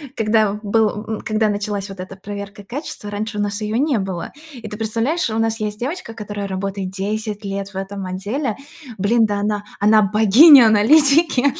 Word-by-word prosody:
когда 215 Hz, -2 st, +2 dB
в 210 Hz, -, -6 dB
был, 210 Hz, 0 st, 0 dB
м, 220 Hz, -1 st, -5 dB
когда 215 Hz, 0 st, 0 dB
началась 205 Hz, -1 st, -3 dB
вот 195 Hz, -2 st, -11 dB
эта 185 Hz, +1 st, -8 dB
проверка 200 Hz, +1 st, -8 dB
качества, 235 Hz, -2 st, -7 dB
раньше 210 Hz, +1 st, -4 dB
у -, -, 0 dB
нас 205 Hz, +1 st, -3 dB
ее 215 Hz, +1 st, -2 dB
не 275 Hz, -3 st, +1 dB
было. 190 Hz, -3 st, -5 dB, 0.2 s
И 235 Hz, -4 st, -9 dB
ты 210 Hz, -, -7 dB
представляешь, 230 Hz, +8 st, -1 dB
у 220 Hz, -, -3 dB
нас 225 Hz, 0 st, 0 dB
есть 210 Hz, -1 st, -4 dB
девочка, 270 Hz, -1 st, -5 dB
которая 205 Hz, -2 st, -6 dB
работает 195 Hz, 0 st, -4 dB
10 210 Hz, +2 st, -4 dB
лет 195 Hz, 0 st, -4 dB
в 200 Hz, -, -18 dB
этом 195 Hz, 0 st, -5 dB
отделе, 205 Hz, +7 st, -3 dB, 0.4 s
блин, 220 Hz, +4 st, +2 dB
да 205 Hz, -1 st, -2 dB
она, 205 Hz, 0 st, -2 dB, 0.2 s
она 215 Hz, +1 st, +5 dB
богиня 220 Hz, -, +7 dB
аналитики 280 Hz, +6 st, +4 dB
210 Hz, 185 wpm, -19 LUFS, 200-225 Hz, 0.4 s, богиня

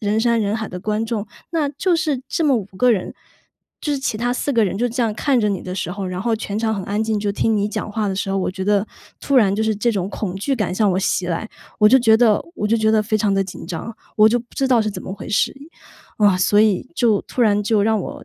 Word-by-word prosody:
人 210 Hz, 0 st, 0 dB
山 235 Hz, 0 st, +2 dB
人 205 Hz, 0 st, 0 dB
海 220 Hz, -1 st, -4 dB
的 180 Hz, -, -7 dB
观 215 Hz, +3 st, -1 dB
众， 220 Hz, -2 st, -3 dB, 0.2 s
那 320 Hz, -4 st, 0 dB
就 355 Hz, +4 st, 0 dB
是 305 Hz, -6 st, -1 dB
这 330 Hz, -, -1 dB
么 280 Hz, -4 st, +4 dB
5 215 Hz, -, -2 dB
个 250 Hz, 0 st, +4 dB
人， 195 Hz, -5 st, -3 dB, 0.7 s
就 295 Hz, -, -2 dB
是 280 Hz, -, -1 dB
其 265 Hz, -5 st, -2 dB
他 240 Hz, +2 st, -1 dB
4 255 Hz, -, -2 dB
个 230 Hz, -4 st, +3 dB
人 190 Hz, 0 st, -2 dB
就 245 Hz, +2 st, +1 dB
这 245 Hz, +2 st, -1 dB
样 225 Hz, -2 st, 0 dB
看 270 Hz, +3 st, +1 dB
着 210 Hz, -, +1 dB
你 195 Hz, -, -2 dB
的 180 Hz, -, -6 dB
时 185 Hz, -2 st, -3 dB
候， 195 Hz, +1 st, -4 dB
然 185 Hz, 0 st, -4 dB
后 235 Hz, 0 st, +1 dB
全 210 Hz, -1 st, -4 dB
场 220 Hz, 0 st, 0 dB
很 195 Hz, -, -4 dB
安 205 Hz, +2 st, -1 dB
静， 220 Hz, -1 st, -1 dB
就 205 Hz, 0 st, -1 dB
听 220 Hz, +2 st, +1 dB
你 205 Hz, 0 st, 0 dB
讲 210 Hz, -, -4 dB
话 215 Hz, -1 st, -1 dB
的 190 Hz, -, -2 dB
时 195 Hz, 0 st, -2 dB
候， 195 Hz, -, 0 dB
我 185 Hz, -, -1 dB
觉 190 Hz, +1 st, -5 dB
得， 205 Hz, +1 st, +2 dB, 0.3 s
突 280 Hz, -, 0 dB
然 200 Hz, -6 st, +4 dB
就 215 Hz, -, 0 dB
是 220 Hz, 0 st, +1 dB
这 235 Hz, +4 st, +1 dB
种 190 Hz, -3 st, -2 dB
恐 200 Hz, -3 st, -4 dB
惧 270 Hz, +8 st, -1 dB
感 205 Hz, -6 st, -1 dB
向 210 Hz, 0 st, +2 dB
我 180 Hz, -, 0 dB
袭 190 Hz, -1 st, 0 dB
来， 180 Hz, +5 st, -3 dB, 0.3 s
我 210 Hz, -, +7 dB
就 260 Hz, +4 st, +6 dB
觉 225 Hz, -3 st, +5 dB
得 225 Hz, -3 st, +3 dB
我 210 Hz, -, -2 dB
就 215 Hz, -, +2 dB
觉 220 Hz, -1 st, +2 dB
得 215 Hz, -1 st, +3 dB
非 215 Hz, +1 st, 0 dB
常 205 Hz, -2 st, +1 dB
地 195 Hz, -, +2 dB
紧 185 Hz, -, -9 dB
张， 180 Hz, +7 st, -6 dB, 0.2 s
我 215 Hz, -, +7 dB
就 240 Hz, +2 st, +2 dB
不 240 Hz, -, -11 dB
知 270 Hz, -, 0 dB
道 245 Hz, -3 st, +4 dB
是 215 Hz, -, 0 dB
怎 -, -, -7 dB
么 -, -, -6 dB
回 200 Hz, -, -8 dB
事。 -, -, +1 dB, 0.6 s
啊， 205 Hz, -3 st, +4 dB
所 205 Hz, +3 st, +3 dB
以 215 Hz, +1 st, +2 dB
就 230 Hz, -9 st, +2 dB
突 250 Hz, -, -2 dB
然 210 Hz, -2 st, +3 dB
就 210 Hz, 0 st, +2 dB
让 220 Hz, 0 st, +2 dB
我 -, -, -7 dB
215 Hz, 305 characters per minute, -20 LUFS, 200-235 Hz, 0.7 s, 我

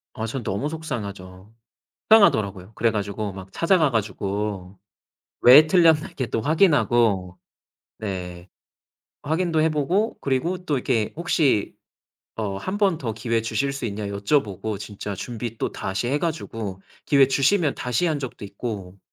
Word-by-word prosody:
아 110 Hz, -2 st, -3 dB
전 120 Hz, +1 st, -4 dB
너무 100 Hz, +11 st, -2 dB
속상하죠. 100 Hz, -11 st, -7 dB, 0.6 s
속상하더라고요. 105 Hz, -, +4 dB
그래 115 Hz, -, +2 dB
가지고 100 Hz, 0 st, -3 dB
막 95 Hz, 0 st, -10 dB
찾아가 165 Hz, -, +2 dB
가지고 100 Hz, -3 st, -3 dB, 0.6 s
왜 145 Hz, +6 st, +9 dB
틀렸나 160 Hz, -3 st, +4 dB
이렇게 130 Hz, -, -4 dB
또 115 Hz, 0 st, -2 dB
확인하고 120 Hz, -, +2 dB, 0.6 s
네 90 Hz, -3 st, -6 dB, 0.7 s
확인도 160 Hz, +1 st, 0 dB
해 160 Hz, -, +3 dB
보고 175 Hz, +9 st, 0 dB
그리고 140 Hz, +7 st, -1 dB
또 150 Hz, -, +1 dB
이렇게 120 Hz, -4 st, 0 dB
혹시 150 Hz, -, +1 dB, 0.6 s
어 100 Hz, -3 st, -3 dB
'1 185 Hz, -, -4 dB
번 195 Hz, -6 st, +2 dB
더 115 Hz, -6 st, -3 dB
기회 115 Hz, 0 st, -1 dB
주실 115 Hz, +5 st, -1 dB
수 140 Hz, -2 st, -5 dB
있냐.' 105 Hz, 0 st, -4 dB
여쭤보고 100 Hz, -1 st, -1 dB
진짜 100 Hz, 0 st, -6 dB
준비 115 Hz, +3 st, -6 dB
또 -, -, -2 dB
다시 95 Hz, +5 st, -3 dB
해 145 Hz, +3 st, +1 dB
가지고 115 Hz, -, -4 dB, 0.2 s
기회 140 Hz, -2 st, +5 dB
주시면 145 Hz, +3 st, +2 dB
다시 125 Hz, +8 st, 0 dB
한 155 Hz, -3 st, 0 dB
적도 130 Hz, -6 st, -7 dB
있고 100 Hz, -2 st, -6 dB
115 Hz, 290 characters per minute, -23 LUFS, 100-150 Hz, 0.7 s, 왜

